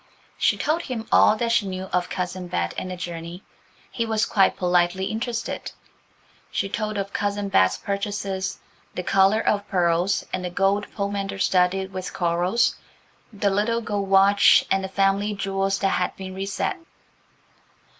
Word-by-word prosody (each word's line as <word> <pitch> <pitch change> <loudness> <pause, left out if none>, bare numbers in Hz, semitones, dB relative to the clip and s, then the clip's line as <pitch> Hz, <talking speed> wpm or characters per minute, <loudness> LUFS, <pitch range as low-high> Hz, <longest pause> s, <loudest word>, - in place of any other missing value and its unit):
She - - +2
told 315 +3 0
him 245 -8 -5
all 215 - +6
that 230 +1 -1
she 220 -3 +2
knew 185 0 -4
of 180 0 0
Cousin 180 0 -4
Bet 85 - -2
and 185 - -4
the 185 - -5
journey. 175 0 -7 0.5
He 230 - -1
was 220 0 0
quite 195 -4 +2
politely 180 +1 +1
interested. 230 +2 -3 0.8
She 195 - -2
told 215 +1 -3
of 200 0 -4
Cousin 205 -1 -1
Bet's 95 - +3
purchases–the 200 -2 -5
collar 195 +4 +3
of 205 -1 +1
pearls, 175 +1 +1
and 185 - -2
the 180 - -2
gold 195 +3 +1
pomander 200 -1 -3
studded 190 0 +1
with 185 0 -5
corals, 175 +6 +1 0.5
the 205 -2 0
little 225 +4 +1
gold 205 -3 -3
watch, 195 -1 +6
and 195 0 +2
the 190 - -4
family 195 +2 +1
jewels 195 0 -1
that 195 -1 +1
had 180 -1 -1
been 190 -1 -7
reset. 195 - -2
195 Hz, 155 wpm, -24 LUFS, 185-205 Hz, 0.8 s, all